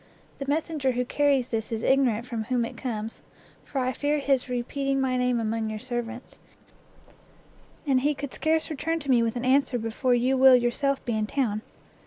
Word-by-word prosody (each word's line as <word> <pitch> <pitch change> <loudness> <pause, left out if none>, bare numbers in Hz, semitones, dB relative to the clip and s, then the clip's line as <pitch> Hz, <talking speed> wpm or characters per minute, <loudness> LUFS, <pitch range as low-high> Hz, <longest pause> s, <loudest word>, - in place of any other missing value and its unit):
The 275 - -5
messenger 295 -2 0
who 250 +1 -1
carries 275 -2 +1
this 225 0 -3
is 225 -1 -3
ignorant 250 -4 +2
from 230 -3 -4
whom 245 0 0
it - - -8
comes, 225 -3 -5 0.4
for 280 - -7
I 255 0 0
fear 290 +3 0
his 275 -3 0
repeating 270 +3 -1
my 260 -1 +1
name 250 -1 +1
among 225 0 -1
your 215 - -4
servants, 240 +1 -6 1.5
and 270 -3 +3
he 295 +2 +1
could 280 -1 -6
scarce 315 0 0
return 325 +3 -1
to 280 -2 -1
me 240 -2 +5
with 230 0 0
an 245 +1 -3
answer 265 -1 +3
before 240 +3 0
you 255 +2 +2
will 260 0 +8
yourself 250 +3 0
be 235 - -1
in 215 -1 -1
town. 215 -5 -1
255 Hz, 190 wpm, -26 LUFS, 235-275 Hz, 1.5 s, will